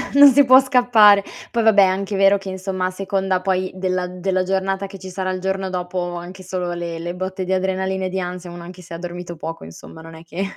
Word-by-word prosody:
Non 285 0 +10
si 285 +2 +5
può 255 0 +8
scappare. 240 -6 +5 0.3
Poi 235 -1 0
vabbè, 220 -2 +6
è - - +7
anche 195 +2 -1
vero 195 +1 +4
che, 195 -1 -8
insomma, 190 0 -3
a 185 - -1
seconda 190 -1 -1
poi 185 0 -1
della 185 -1 -1
della 185 +1 -1
giornata 195 +1 -1
che 195 0 -11
ci 190 0 -9
sarà 185 0 -3
il 185 0 -4
giorno 190 0 -2
dopo, 180 -1 -3
anche 175 +2 -8
solo 180 -1 -3
le 170 -1 -5
le 175 +1 -4
botte 185 +1 -4
di 185 - -4
adrenalina 190 0 -1
e - - -2
di 190 +1 -3
ansia, 180 0 -6
uno 175 0 -9
anche 180 +1 -11
se 170 - -12
ha - - -5
dormito 175 0 -7
poco, 165 - -7
insomma, 85 - -12
non 165 0 -12
è 160 - -12
che 170 +3 -5
185 Hz, 245 wpm, -20 LUFS, 180-195 Hz, 0.3 s, Non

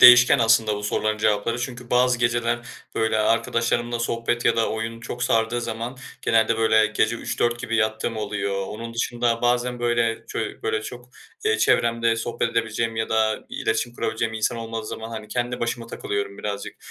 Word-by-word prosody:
değişken 125 +2 +9
aslında 115 -2 +4
bu 105 - -6
soruların 110 +1 0
cevapları. 110 +2 +1
Çünkü 125 0 -6
bazı 125 0 +3
geceler, 120 0 +1 0.4
böyle, 110 -1 +1
arkadaşlarımla 115 +2 +1
sohbet 115 0 -1
ya 115 - +4
da 115 - +2
oyun 115 +1 -4
çok 120 +1 -6
sardığı 115 +1 +2
zaman, 115 +2 -4 0.3
genelde, 115 0 +3
böyle, 110 -1 +4
gece 110 +2 +1
03.00-04.00 120 0 -1
gibi 115 -2 -1
yattığım 110 +1 0
oluyor. 100 -2 -2
Onun 115 +2 -7
dışında 120 0 0
bazen 125 0 +1
böyle 120 -1 +1
ço - - -4 0.2
böyle 110 - 0
çok, 125 +2 -8 0.4
eee, 440 +1 +2
çevremde 115 0 +3
sohbet 115 0 -1
edebileceğim 115 0 -1
ya 110 - -1
da 110 -1 +1
iletişim 115 +2 -1
kurabileceğim 115 -1 -2
insan 110 +2 0
olmadığı 115 -1 -5
zaman 110 +1 -6
hani 110 -2 -7
kendi 120 +2 -2
başıma 115 0 -2
takılıyorum 100 -3 -4
birazcık. 100 -1 -5
115 Hz, 165 wpm, -24 LUFS, 110-120 Hz, 0.4 s, değişken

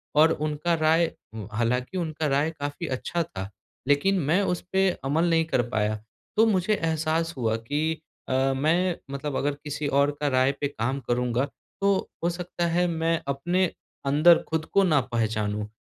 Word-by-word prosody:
और 160 +2 +6 0.2
उनका 155 +3 -1
राय 160 +2 +3 0.4
हालाँकि 125 - -1
उनका 160 -3 -2
राय 145 +3 +1
काफ़ी 145 +4 -4
अच्छा 165 +6 -2
था, 95 -7 -7 0.4
लेकिन 185 +7 +3
मैं 160 +5 +2
उस 175 - -4
पे 190 0 +3
अमल 160 +6 +1
नहीं 165 -1 +3
कर 160 - +1
पाया। 110 -2 0 0.4
तो 225 - +6
मुझे 200 0 +2
एहसास 165 -1 0
हुआ 110 -2 +1
कि 150 +7 -2 0.3
अ, 135 +1 +2
मैं 165 +6 +2 0.2
मतलब 140 0 -4
अगर 145 +1 0
किसी 150 0 -3
और 140 +1 +3
का 150 - 0
राय 130 0 +3
पे 145 - +2
काम 130 +1 -2
करूँगा, 125 +1 +1
तो 195 +7 -2 0.3
हो 170 - +3
सकता 175 0 -3
है 175 +1 +2
मैं 165 0 0
अपने 175 +7 +1 0.4
अंदर 155 +5 +6
खुद 160 0 -1
को 200 - +5
ना 155 -6 +4
पहचानूँ। 105 -2 -1
150 Hz, 165 wpm, -26 LUFS, 135-170 Hz, 0.4 s, और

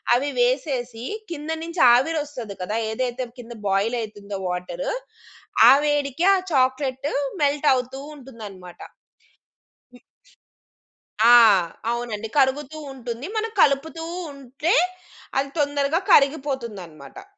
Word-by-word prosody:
అవి 280 +4 0
వేసేసి 245 -2 -1 0.3
కింద 300 -1 -6
నుంచి 335 +1 -3
ఆవిరొస్తది 265 -6 -1
కదా! 210 +4 -2
ఏదైతే 250 +2 -2
కింద 235 0 -9
బాయిలైతుందో 205 -1 -2
వాటరు, 180 - -4 0.8
ఆ - - +10
వేడికి 290 +2 0
ఆ - - +2 0.2
చాక్లెటు 260 +1 0 0.3
మెల్ట్ 290 +1 +1
అవుతూ 255 +1 -3 0.2
ఉంటుందన్నమాట. 210 -9 -11 1.2
ఇ - - -19 1.3
ఆ! - - +7 0.6
అవునండి. 230 -2 -4
కరుగుతూ 280 +3 +1 0.2
ఉంటుంది. 240 0 -6
మనం 450 +1 -2
కలుపుతూ 305 +4 +1 0.3
ఉంటే 275 +6 -2 0.7
అది 275 0 -2
తొందరగా 290 +3 +1
కరిగిపోతుందన్నమాట. 270 - -1
260 Hz, 95 wpm, -23 LUFS, 230-290 Hz, 1.3 s, ఆ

